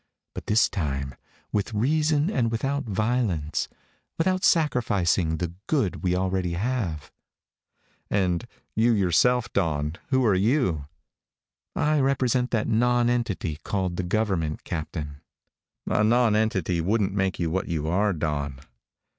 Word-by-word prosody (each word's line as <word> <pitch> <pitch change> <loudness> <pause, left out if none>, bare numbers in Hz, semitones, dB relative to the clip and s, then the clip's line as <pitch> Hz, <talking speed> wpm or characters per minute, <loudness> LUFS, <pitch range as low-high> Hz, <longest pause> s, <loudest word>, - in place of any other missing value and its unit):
But - - -8
this 110 +2 +4
time 70 -7 -3 0.4
with 105 +2 -1
reason 150 - +2
and 115 - +1
without 135 +5 -1
violence 105 -8 -1 0.5
without 185 +2 +1
sacrificing 100 - +2
the 85 0 -3
good 135 - +1
we 90 -1 +1
already 95 -1 -1
have." 95 - -2 1.0
"And 95 +2 0 0.3
you 115 +2 +4
yourself, 115 +5 +2
Dawn. 75 -3 0
Who 130 -2 +2
are 105 - +4
you?" 95 - +1 0.9
"I 150 0 +2
represent 130 -2 +1
that 115 -3 0
nonentity 120 -8 +1
called 95 -3 -2
the - - 0
government, 90 -5 -1
Captain." 75 -3 -5 0.6
"A 105 - +1
nonentity 110 -6 +2
wouldn't 100 +2 +1
make 95 -1 0
you 85 -2 -1
what 95 +2 -1
you 80 -3 -2
are, 100 +5 +2
Dawn." 75 -5 -2
100 Hz, 120 wpm, -25 LUFS, 85-120 Hz, 1.0 s, this